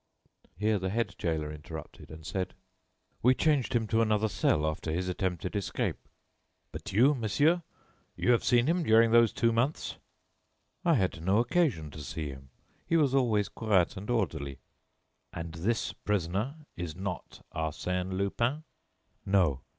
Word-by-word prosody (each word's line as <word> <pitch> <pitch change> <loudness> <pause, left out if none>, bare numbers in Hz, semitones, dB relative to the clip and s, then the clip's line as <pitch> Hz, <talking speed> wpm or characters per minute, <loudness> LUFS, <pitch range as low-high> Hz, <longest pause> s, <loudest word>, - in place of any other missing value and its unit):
Here 105 +1 +1
the 95 0 -2
head 105 -2 -1
gaoler 80 -3 -1
interrupted, 75 0 -9
and 80 0 -11
said: 95 +2 -3 0.7
"We 130 +2 +5
changed 140 -4 +2
him 115 -2 +2
to 115 0 +3
another 110 -1 +2
cell 75 -4 +1
after 80 +1 -2
his 90 +3 -1
attempted 90 0 -2
escape." 100 - -2 0.6
"But - - -7
you, 125 +9 +5
monsieur, 145 - +2 0.5
you 125 - +2
have 120 - +3
seen 120 0 +4
him 170 +4 +2
during 115 -5 +5
those 115 -1 +6
two 115 -1 +2
months?" 120 +7 -1 0.9
"I 170 -3 +4
had 95 - 0
no 95 +4 +3
occasion 120 - +1
to 75 - -8
see 75 +2 -4
him. 65 -1 -10 0.4
He 165 - +3
was 145 -5 +3
always 115 -7 +2
quiet 100 -6 +1
and 100 +4 -7
orderly." 70 - -1 0.8
"And 85 -1 -5
this 105 +8 -1
prisoner 105 - -1 0.2
is 85 -3 -5
not 95 0 -6
Arsène 90 +4 -2
Lupin?" 115 +10 0 0.6
"No." 90 -9 +2
100 Hz, 150 wpm, -30 LUFS, 85-120 Hz, 0.9 s, those